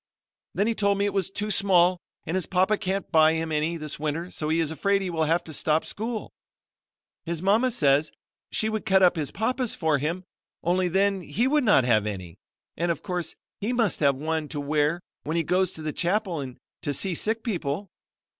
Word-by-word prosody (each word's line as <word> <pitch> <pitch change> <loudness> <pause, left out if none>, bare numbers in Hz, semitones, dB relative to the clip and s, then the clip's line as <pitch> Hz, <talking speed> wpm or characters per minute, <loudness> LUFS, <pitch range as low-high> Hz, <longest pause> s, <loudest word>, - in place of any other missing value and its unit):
Then 200 - +2
he 230 - +1
told 200 -2 +1
me 200 - +1
it 205 - -1
was 195 -2 0
too 205 +2 -3
small 185 -3 +4 0.3
and 160 - -3
his 185 -2 -1
papa 190 +3 +2
can't 195 0 -3
buy 160 0 +6
him 160 0 -2
any 155 +2 0
this 155 -2 -5
winter 155 +4 -3
so 155 - -3
he 160 +1 +2
is 160 -2 0
afraid 200 +4 +1
he 185 - -3
will 160 -2 0
have 165 +3 +1
to 160 - -8
stop 155 +2 +1
school. 220 +1 -4 0.9
His 170 -1 -3
mama 220 +6 +3
says 150 - +2 0.4
she 215 - 0
would 220 -1 -2
cut 190 -3 +4
his 150 -4 -2
papa's 245 +3 -1
up - - -20
for 160 -4 +2
him, 165 +6 -2 0.4
only 180 +2 +2
then 195 +2 +1
he 185 - 0
would 295 +1 +2
not 205 - +5
have 110 -4 +2
any; 95 -5 -6 0.4
and 175 +2 -1
of 170 - -2
course 180 -2 -3 0.2
he 220 +5 -1
must 230 -6 +1
have 140 -2 +3
one 155 +2 -2
to 145 - -5
wear 150 +3 +1 0.2
when 155 +3 -2
he 165 - +2
goes 180 +2 +1
to 160 - -9
the 155 -1 -3
chapel 180 -2 0
and 130 -3 -6 0.2
to 145 - -1
see 190 -2 0
sick 220 +6 -1
people. 180 - -3
175 Hz, 210 wpm, -26 LUFS, 155-200 Hz, 0.9 s, buy